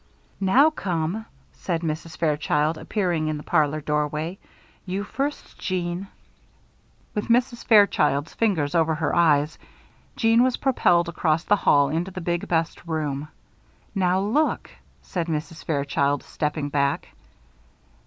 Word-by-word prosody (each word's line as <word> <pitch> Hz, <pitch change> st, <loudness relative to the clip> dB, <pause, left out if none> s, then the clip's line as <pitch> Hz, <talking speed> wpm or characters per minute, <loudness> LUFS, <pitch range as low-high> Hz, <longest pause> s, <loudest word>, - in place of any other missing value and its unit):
"Now 255 Hz, +11 st, +5 dB
come," 185 Hz, -, -2 dB, 0.3 s
said 170 Hz, -3 st, -3 dB
Mrs. 160 Hz, 0 st, -4 dB
Fairchild, 150 Hz, 0 st, +1 dB
appearing 175 Hz, -7 st, -1 dB
in 155 Hz, -1 st, -1 dB
the 150 Hz, -, -8 dB
parlor 155 Hz, -2 st, +1 dB
doorway. 150 Hz, +4 st, -2 dB, 0.4 s
"You 190 Hz, +2 st, -3 dB
first, 275 Hz, +7 st, -4 dB
Jeanne." 180 Hz, 0 st, -2 dB, 1.1 s
With 210 Hz, -, -3 dB
Mrs. 240 Hz, 0 st, +1 dB
Fairchild's 160 Hz, -, +3 dB
fingers 170 Hz, -11 st, 0 dB
over 160 Hz, -1 st, +2 dB
her 155 Hz, -1 st, -1 dB
eyes, 150 Hz, -3 st, +3 dB, 0.6 s
Jeanne 225 Hz, 0 st, +4 dB
was 255 Hz, 0 st, +2 dB
propelled 175 Hz, -11 st, +2 dB
across 165 Hz, -1 st, 0 dB
the 205 Hz, -, +3 dB
hall 145 Hz, -6 st, +4 dB
into 165 Hz, +5 st, -1 dB
the 185 Hz, -, -7 dB
big, 175 Hz, 0 st, -2 dB
best 165 Hz, -1 st, -1 dB
room. 150 Hz, -3 st, -2 dB, 0.7 s
"Now 185 Hz, -2 st, +2 dB
look!" 260 Hz, +11 st, 0 dB, 0.3 s
said 175 Hz, -2 st, -3 dB
Mrs. 160 Hz, 0 st, -4 dB
Fairchild, 140 Hz, -1 st, 0 dB
stepping 150 Hz, -1 st, -3 dB
back. 140 Hz, -1 st, 0 dB
165 Hz, 125 wpm, -24 LUFS, 150-195 Hz, 1.1 s, Now